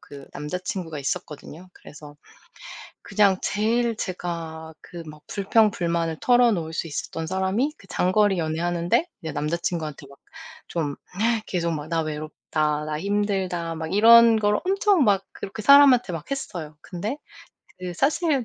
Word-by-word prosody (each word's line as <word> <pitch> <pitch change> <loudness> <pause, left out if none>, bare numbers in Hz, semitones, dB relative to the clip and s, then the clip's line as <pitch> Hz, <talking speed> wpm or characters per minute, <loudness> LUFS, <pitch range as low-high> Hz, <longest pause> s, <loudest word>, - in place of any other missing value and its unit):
그 140 -1 -12
남자친구가 165 +1 -5
있었거든요. 160 +3 -6
그래서 150 -1 -13 0.9
그냥 200 -2 +2
제일 230 +3 0
제가 165 -4 -5
그 170 -1 -10
막 150 -1 -11
불평불만을 175 -6 +1
털어놓을 230 -10 +3
수 165 - -2
있었던 160 +2 -5
사람이 190 - 0
그 195 - -18
장거리 195 +1 +2
연애하는데 170 - 0 0.2
남자친구한테 160 -1 -3
이제 - - -15
막 140 - -16 0.5
좀 150 -4 -3 0.5
계속 170 -2 -1 0.2
"나 165 -1 0
외롭다, 155 0 -2
나 155 0 -3
힘들다."막 185 -5 -2
이런 230 +1 +7
걸 210 0 +2
엄청 390 -3 +3
막 195 -2 +3
그렇게 200 +2 -7
사람한테 270 -3 +6
막 165 - -7
했어요. 175 - -5
근데 205 +10 -5 0.6
그 180 -1 -6
사실 280 - +1
180 Hz, 295 characters per minute, -24 LUFS, 160-210 Hz, 0.9 s, 이런